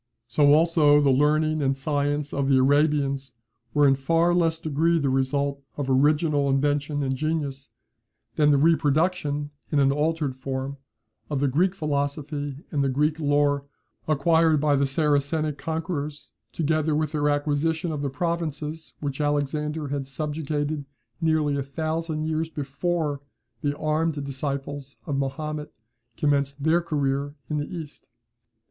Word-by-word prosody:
So, 145 +5 +4
also, 155 -2 +5
the 140 -2 +4
learning 155 +3 +2
and 135 -1 +1
science 145 +1 -1
of 140 -1 0
the 135 - +5
Arabians 140 -1 +2 0.4
were 145 -1 +4
in 135 - +5
a - - +1
far 165 +6 +2
less 165 -2 +2
degree 160 +2 +1
the 140 -4 +1
result 140 +1 0 0.2
of 140 -2 -1
original 145 +1 +3
invention 145 +1 +1
and 135 -1 0
genius, 145 -2 -2 0.7
than 150 -1 +4
the 145 - +5
reproduction, 150 -1 +1 0.2
in 150 - +1
an 135 -1 +4
altered 150 -1 0
form, 135 +1 -4 0.5
of 145 -3 -1
the 140 - +2
Greek 175 +8 +2
philosophy 145 -2 -3
and 145 -3 +1
the 135 - +1
Greek 150 +4 +1
lore, 145 -1 +2 0.4
acquired 160 +1 +3
by 145 0 +3
the 140 0 +2
Saracenic 150 +1 0
conquerors 160 -2 -4 0.2
together 155 -1 0
with 155 -1 0
their 150 -1 +1
acquisition 155 +3 0
of 150 -2 -3
the 140 - -1
provinces 160 0 -3
which 145 0 -3
Alexander 150 +1 -1
had 140 -1 -3
subjugated 150 +1 -2 0.4
nearly 155 -3 +2
a - - 0
thousand 155 +3 -3
years 160 0 -1
before 150 0 -2 0.4
the 145 0 -1
armed 155 +1 0
disciples 140 0 -4
of 140 -3 -2
Mahomet 150 +2 -3 0.5
commenced 140 -1 0
their 165 +3 +3
career 145 -3 -1 0.2
in 150 - 0
the 145 - -3
East. 160 -4 -8
145 Hz, 145 wpm, -25 LUFS, 140-155 Hz, 0.7 s, also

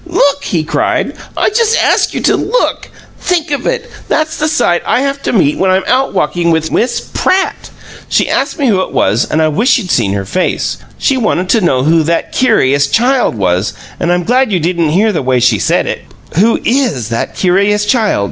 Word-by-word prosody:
"LOOK!" 285 -5 +1
he 165 -4 -1
cried. 155 - -1 0.2
"I - - +2
just 455 +1 +2
ask - - +2
you - - -2
to - - +2
look! - - -1 0.3
Think 340 -3 -1
of 285 - -2
it: 485 -1 -2 0.2
that's 310 0 -1
the 305 - 0
sight 175 - +1
I 250 - +1
have 280 0 -2
to - - -2
meet 170 -10 +1
when 190 - +2
I'm 185 +1 +2
out 260 +2 +1
walking 175 -1 0
with 160 -1 0
Miss 245 - 0
PRATT! 380 +1 0 0.4
She - - +1
asked - - -1
me 285 - -1
who 200 -7 +2
it - - -5
was, 110 +4 +1
and 160 +1 +1
I - - +3
wish 225 - +2
you'd 195 -8 -4
seen 100 - +1
her 100 -1 -3
face. 185 - -2 0.2
She 270 - +1
wanted 185 -6 -1
to 230 - +3
know 130 -8 +1
who 160 +3 +3
'that 165 +2 -1
curious 140 - +2
child' 245 - +1
was, 95 -1 0 0.3
and 175 - 0
I'm 175 0 +1
glad 250 +3 +1
you 185 - +1
didn't 170 -1 0
hear 205 +8 +2
the 165 - -1
way 130 -1 +1
she 120 -4 +2
said - - +1
it. - - -4 0.3
'Who 215 +7 +3
IS 235 - 0
that 115 - -3
curious 200 +3 +1
child?' 220 - +1
190 Hz, 210 wpm, -12 LUFS, 155-260 Hz, 0.4 s, I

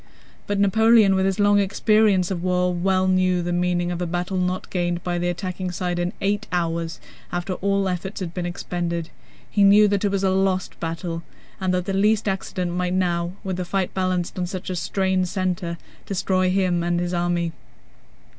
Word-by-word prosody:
But 205 -1 0
Napoleon 220 +1 +5
with 190 0 +2
his 195 +1 -1
long 205 0 +5
experience 200 -1 +3
of 175 -3 -2
war 180 0 +1
well 185 +1 +1
knew 185 -1 +2
the 175 0 -2
meaning 175 0 0
of 175 0 -3
a 175 - -1
battle 180 +2 -2
not 180 0 -1
gained 175 -1 -1
by 175 -1 -1
the 175 0 0
attacking 185 +1 -3
side 180 0 -2
in 175 +1 0
eight 205 +2 0
hours, 165 -2 -1 0.3
after 175 +2 -2
all 195 +1 0
efforts 185 +2 -3
had 175 -3 -5
been 175 -1 -3
expended. 170 -1 -3 0.4
He 205 - +2
knew 205 +1 +7
that 200 0 0
it 205 - +2
was 195 0 -1
a 190 - +3
lost 190 -1 0
battle 165 0 -4 0.4
and 190 -1 0
that 180 -1 -1
the 195 - -2
least 210 +2 +2
accident 190 -2 -2
might 180 0 -1
now—with 180 +1 -1
the 180 - -2
fight 185 +1 -1
balanced 185 -1 -1
on 180 - -1
such 185 0 -5
a - - -2
strained 190 0 0
center—destroy 185 +1 -2
him 185 -2 +1
and 175 0 0
his 175 0 -2
army. 175 -1 0
185 Hz, 185 wpm, -23 LUFS, 175-195 Hz, 0.4 s, knew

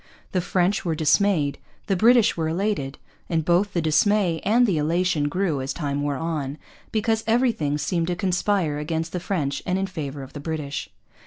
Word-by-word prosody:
The 185 - +1
French 180 +2 +1
were 165 -3 -1
dismayed, 155 -1 +2 0.3
the 195 - +1
British 230 +3 +5
were 160 -1 -1
elated; 165 -6 -1 0.3
and 160 -2 0
both 180 +4 +2
the 170 - 0
dismay 170 +2 +2
and 235 +5 +4
the 185 -9 +1
elation 160 -1 +1
grew 170 -4 0
as 135 +1 -3
time 145 -3 -2
wore 145 -1 -1
on, 150 -3 -3 0.3
because 220 0 0
everything 225 - +2
seemed 165 +3 -1
to 180 - 0
conspire 180 -4 0
against 160 +2 -2
the 180 - -2
French 150 -7 -2
and 180 +1 0
in 195 - 0
favour 145 -7 -5
of 135 - -12
the 145 - -6
British. 150 -2 -4
170 Hz, 180 wpm, -24 LUFS, 150-195 Hz, 0.3 s, British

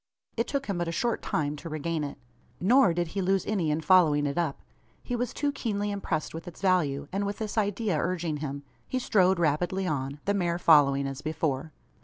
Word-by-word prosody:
It 230 +1 0
took 275 -1 -2
him 195 -4 -2
but 175 - -1
a - - -1
short 235 +6 -1
time 145 -1 -1
to 165 - -8
regain 155 +1 -2
it. 145 - -5 0.4
Nor 240 +3 +5
did 170 0 -1
he 195 - -2
lose 190 0 +1
any 190 -7 0
in 150 +2 0
following 155 -3 +4
it 140 -1 -1
up. 165 -5 -1 0.4
He 245 - -3
was 245 0 -1
too 290 +1 -1
keenly 205 -6 -2
impressed 180 -6 -2
with 165 +3 -7
its 175 - -9
value; 150 -7 +1
and 195 +2 -1
with 200 0 -3
this 215 -2 -4
idea 205 -4 0
urging 170 -3 -1
him, 140 -1 -5 0.2
he 255 - -2
strode 190 -7 +3
rapidly 175 +4 0
on, 140 -3 -2
the 200 - +2
mare 175 -4 0
following 140 -5 +5
as 135 0 -5
before. 155 -1 -2
175 Hz, 210 wpm, -28 LUFS, 150-200 Hz, 0.4 s, Nor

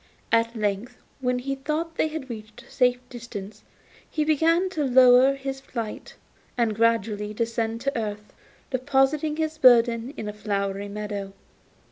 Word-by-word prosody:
At 230 +1 +2
length, 215 +3 -2 0.2
when 250 -1 0
he 270 +2 -3
thought 305 +4 -3
they - - +1
had 310 -3 -6
reached 215 -3 -9
a - - -20
safe 250 -1 +3
distance, 220 -4 -9 0.5
he 310 - 0
began 330 +4 +3
to 310 -5 -1
lower 255 0 +6
his 270 0 -5
flight, 230 -5 -6 0.4
and 230 -3 +2
gradually 215 -2 0
descending 230 0 -1
to 275 - -1
earth, 210 -2 -4 0.4
deposited 280 +3 +1
his 315 -1 -2
burden 240 0 +5
in 215 - -5
a 210 - -4
flowery 200 -1 -3
meadow. 205 -1 -5
240 Hz, 145 wpm, -25 LUFS, 215-275 Hz, 0.5 s, lower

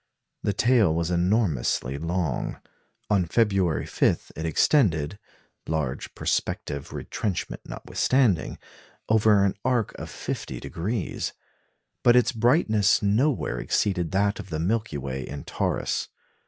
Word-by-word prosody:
The 100 - 0
tail 115 -4 +4
was 85 +1 -1
enormously 85 - +1
long. 85 -3 -2 0.5
On 95 -4 +3
February 95 - +2
5 - - 0
it 80 +2 -3
extended 85 - +2 0.5
large 75 -5 -3
perspective 70 -1 -2
retrenchment 100 -5 -3
notwithstanding 125 -10 +1 0.5
over 110 -2 +5
an 95 - +1
arc 125 -4 +1
of - - -6
50°; 100 +4 -4 0.7
but 120 - +5
its 125 +1 +4
brightness 110 - +3
nowhere 105 - +1
exceeded 90 - 0
that 100 +3 +1
of 95 - -8
the 80 - -2
Milky 105 0 -1
Way 65 -1 -4
in 70 +2 -7
Taurus. - - -1
100 Hz, 115 wpm, -26 LUFS, 80-110 Hz, 0.7 s, over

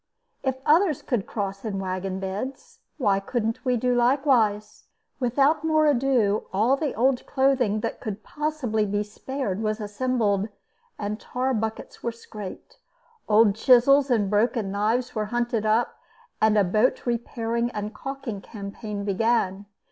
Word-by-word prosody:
If 265 -1 0
others 320 -1 +3
could 235 -7 -1
cross 195 -2 -4
in 210 -4 -3
wagon 190 0 -3
beds, 260 - -5 0.2
why 205 -8 +2
couldn't 225 +2 -2
we 250 -2 +1
do 250 +2 +1
likewise? 240 -5 +2 0.3
Without 275 +5 +2
more 310 -1 +3
ado 250 -7 +2
all 220 +8 +3
the 285 -1 -2
old 250 +2 +2
clothing 260 -6 +2
that - - -3
could 215 -1 -6
possibly 280 -8 -1
be 205 +1 0
spared 215 -1 -4
was 215 0 -1
assembled, 210 -1 0 0.5
and 210 +1 -3
tar 255 +1 -2
buckets 220 -1 -4
were 235 - -1
scraped. 210 -4 -10 0.5
Old 215 -1 +5
chisels 265 +5 +5
and 220 -5 +2
broken 210 0 +1
knives 220 +5 0
were 215 -2 -1
hunted 235 -1 -1
up, 220 +3 +1 0.4
and 215 0 +4
a 205 - +5
boat 215 +7 +1
repairing 235 0 -1
and 210 -1 -5
calking 270 -4 -6
campaign 200 0 -6
began. 200 -1 0
225 Hz, 140 wpm, -25 LUFS, 205-255 Hz, 0.5 s, Old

